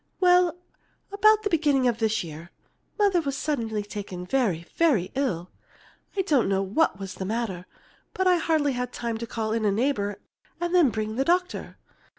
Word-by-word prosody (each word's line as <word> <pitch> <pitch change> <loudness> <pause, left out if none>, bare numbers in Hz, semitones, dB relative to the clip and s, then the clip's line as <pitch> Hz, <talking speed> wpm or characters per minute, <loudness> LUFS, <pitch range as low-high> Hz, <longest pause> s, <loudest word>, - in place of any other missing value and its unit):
"Well, 360 -2 +4 0.5
about 430 +1 +4
the 410 - 0
beginning 290 -6 +3
of 235 -2 0
this 220 -2 +1
year, 165 +1 -9 0.5
Mother 400 -5 +3
was 280 -3 -3
suddenly 230 -9 -2
taken 200 -3 -7
very, 185 -7 0
very 245 - +2
ill. 190 -11 -2 0.7
I 385 - +2
don't 280 - +2
know 195 0 +1
what 200 +4 +1
was 195 -1 -6
the - - -6
matter, 190 -4 -3 0.5
but 375 - 0
I 365 -1 +5
hardly 315 -4 +1
had 250 -1 -3
time 230 -2 -4
to 235 - -5
call 220 -1 -2
in 225 -1 -1
a 210 - +3
neighbor 205 -3 0 0.4
and 345 0 -2
then 345 -7 +5
bring 215 0 -3
the 270 - +2
doctor." 360 +2 -1
240 Hz, 175 wpm, -26 LUFS, 205-330 Hz, 0.7 s, I